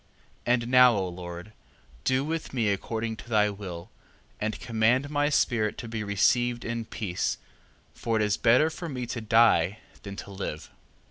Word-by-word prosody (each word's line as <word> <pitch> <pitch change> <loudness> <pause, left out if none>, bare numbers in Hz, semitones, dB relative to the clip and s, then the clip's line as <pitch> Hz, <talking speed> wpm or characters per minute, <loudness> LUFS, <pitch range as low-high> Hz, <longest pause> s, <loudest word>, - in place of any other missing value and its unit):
3:6. 120 - +5
And 120 -1 0
now, 125 -1 +7
O 95 -2 -1
Lord, 90 +3 -8 0.5
do 130 +2 +2
with 160 -3 -4
me 115 -4 +1
according 110 +3 -2
to 120 - -12
thy 105 -2 +3
will, 90 -4 -8 0.5
and 110 0 -2
command 120 +5 +1
my 145 0 +2
spirit 115 -7 +1
to 120 - -6
be 110 -1 -4
received 120 +4 +1
in 115 0 -3
peace: 100 -5 -2 0.6
for 115 -1 -2
it 110 - +2
is 105 -1 +1
better 130 +8 +4
for 170 +1 -6
me 125 -3 -4
to 120 0 -5
die, 110 -4 +4 0.2
than 100 -1 -8
to 100 - -8
live. 95 -6 -6
115 Hz, 175 wpm, -27 LUFS, 100-120 Hz, 0.6 s, now